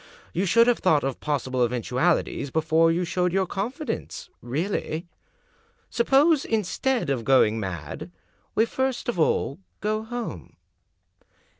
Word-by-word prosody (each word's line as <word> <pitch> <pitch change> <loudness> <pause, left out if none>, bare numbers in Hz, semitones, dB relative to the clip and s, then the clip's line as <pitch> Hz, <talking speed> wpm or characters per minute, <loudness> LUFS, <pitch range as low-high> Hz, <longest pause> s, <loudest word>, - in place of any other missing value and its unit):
You 190 +3 0
should 230 +5 +5
have 245 -1 +2
thought 155 -6 +3
of 135 -1 -2
pos 145 -3 -1
sible 130 -1 +1
eventualities 125 +5 0
before 160 +2 +3
you 175 +2 0
showed 180 +1 0
your 190 +1 +1
confidence 225 - -4
— - - -45 0.2
really. 170 -2 -2 0.9
Suppose, 275 +5 +4
instead 225 - 0
of 125 -4 -1
going 115 -4 +4
mad, 95 -6 -5 0.5
we 225 - +4
first 260 +2 -2
of 240 -7 -2
all 155 -1 +1 0.2
go 215 +1 -1
home?" 240 +2 -6
180 Hz, 135 wpm, -25 LUFS, 140-230 Hz, 0.9 s, should